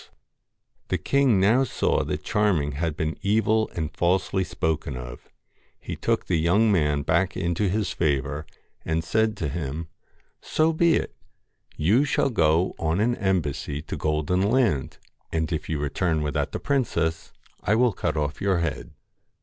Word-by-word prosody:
LOCKS - - -26 0.8
The - - 0
king 140 -7 +2
now 110 +8 +4
saw 130 - 0
that - - -3
Charming 95 -9 +1
had 75 +2 -2
been 80 +1 -2
evil 110 +2 +2
and 80 -2 -3
falsely 95 +2 +1
spoken 80 -6 -2
of; - - -9 0.5
he - - -6
took - - -1
the 90 - +1
young 100 +7 +3
man 75 -6 +2
back 85 +5 +1
into 85 +3 0
his 105 +3 -1
favour, 75 0 -1 0.4
and 80 0 -1
said 110 +4 +1
to 80 - -2
him 80 +2 -4 0.3
' - - -40
So 160 +1 +4
be 165 +1 +3
it. - - -2 0.6
You 100 - +3
shall 140 -1 +1
go 85 -3 +2
on 80 +3 0
an 120 +3 +2
embassy 75 -7 -1
to - - -5
Golden 75 +4 0
Land; 105 - +1 0.3
and 80 +1 -1
if 80 +1 -4
you 80 - 0
return 75 +2 0
without 75 -1 -1
the - - -4
princess, 85 - -1 0.3
I 105 - +2
will 120 -1 +3
cut 85 - -2
off 75 0 -2
your 95 -2 +2
head.' 85 -3 -3
85 Hz, 165 wpm, -25 LUFS, 75-105 Hz, 0.8 s, now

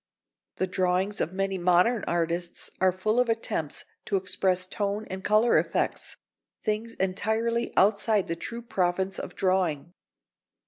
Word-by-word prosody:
The 185 - 0
drawings 185 +2 0
of 170 - -1
many 195 0 -1
modern 180 +6 +3
artists 170 0 -2
are 185 0 +5
full 215 +6 0
of 250 -1 +2
attempts 195 -9 -2 0.2
to 200 - -1
express 185 -1 +1
tone 205 +2 -2
and 190 0 -5
colour 215 +3 +4
effects, - - -1 0.5
things 220 +1 -2
entirely 220 +5 0
outside 205 0 +3
the 165 - -3
true 235 +7 -6
province 190 -2 0
of - - -7
drawing. 180 -4 0
190 Hz, 135 wpm, -27 LUFS, 180-215 Hz, 0.5 s, are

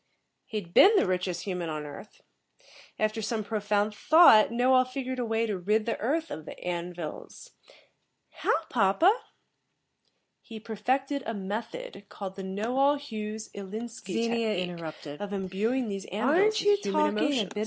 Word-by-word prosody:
"He'd 200 -6 -6
been 420 +3 +8
the - - +4
richest 180 -1 -2
human 180 -4 -3
on 155 -1 -4
Earth. 150 +8 -11 0.8
After 215 +1 0
some 220 0 -2
profound 210 0 0
thought, 265 -3 +7
Knowall 255 +2 +4
figured 255 0 -4
a 245 - -1
way 225 0 0
to 210 -3 -2
rid 210 +4 +1
the 230 - -2
earth 315 +8 -1
of 155 - -6
the - - -9
An 175 0 -3
vils." 175 - -8 0.8
"How, 325 - 0
papa?" 245 - +4 1.3
"He 225 -1 -10
perfected 260 +6 -1
a 225 - -2
method, 210 - -6
called 195 -2 -7
the 195 - -6
Knowall 245 +9 +1
Hughes, 220 -5 -6
Ilinski 220 -1 -3
technique, 155 -2 -8
of 205 0 -5
imbuing 205 +6 -1
these 195 -2 -5
An 220 +9 0
vils 420 +4 +3
with 410 0 +4
human 100 - +1
emotions." 240 -10 +1
215 Hz, 145 wpm, -28 LUFS, 190-255 Hz, 1.3 s, been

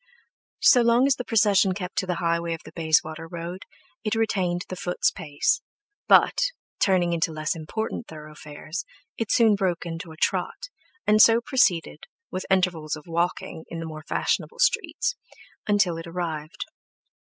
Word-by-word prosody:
So 245 - +7
long 235 +2 +4
as 275 -1 +3
the 250 - -3
procession 205 -5 +3
kept 185 -1 -6
to 185 - -3
the 180 - 0
highway 170 0 0
of 160 - -13
the 155 - -10
Bayswater 160 0 0
Road, 170 +2 -7 0.4
it 215 0 0
retained 185 -6 0
the 185 - -5
foot's 180 +2 0
pace, 145 -6 0 0.5
but, - - +5 0.4
turning 180 -3 +2
into 165 -1 0
less 155 +2 -2
important 220 +9 -4
thorough 155 -1 -10
fares, 150 +2 -7 0.4
it 225 -2 -2
soon 225 -3 +5
broke 185 -4 -1
into 165 0 -6
a 160 - -12
trot, - - -1 0.4
and 215 0 +5
so 230 +1 +7
proceeded, 215 -9 +1 0.3
with 185 - -4
intervals 180 -5 +1
of 150 - -11
walking 170 -1 -2
in 170 - -6
the 165 - -5
more 155 -1 -7
fashionable - - -1
streets, 485 0 +1 0.5
until 200 -5 +2
it 165 - -8
arrived. 165 -2 -4
175 Hz, 160 wpm, -25 LUFS, 165-205 Hz, 0.5 s, So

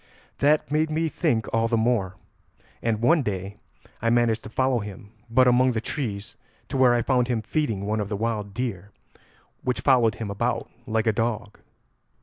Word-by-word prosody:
"That 150 +1 +2
made 155 +1 +2
me 160 +1 0
think 135 -10 0
all 115 0 +2
the 115 0 +1
more, 110 -5 +1 0.7
and 115 -1 -1
one 160 +6 +5
day 100 -3 -4 0.4
I 115 - +1
managed 115 -2 +2
to - - -7
follow 130 +2 +1
him 105 -1 -9 0.2
but 130 +2 +4
among 125 +1 +4
the 110 - 0
trees 110 -4 -4 0.3
to 135 - -2
where 125 -2 +5
I 120 - +1
found 125 -3 +2
him 120 -3 -1
feeding 110 -7 -1
one 110 +1 -1
of 105 -1 -3
the 105 - -2
wild 105 -2 -2
deer, 105 -6 -3 0.7
which 125 - -2
followed 120 -5 +4
him 110 -3 -5
about 100 - -1 0.2
like 110 0 0
a 110 - +3
dog." 110 -2 -2
115 Hz, 180 wpm, -25 LUFS, 105-130 Hz, 0.7 s, one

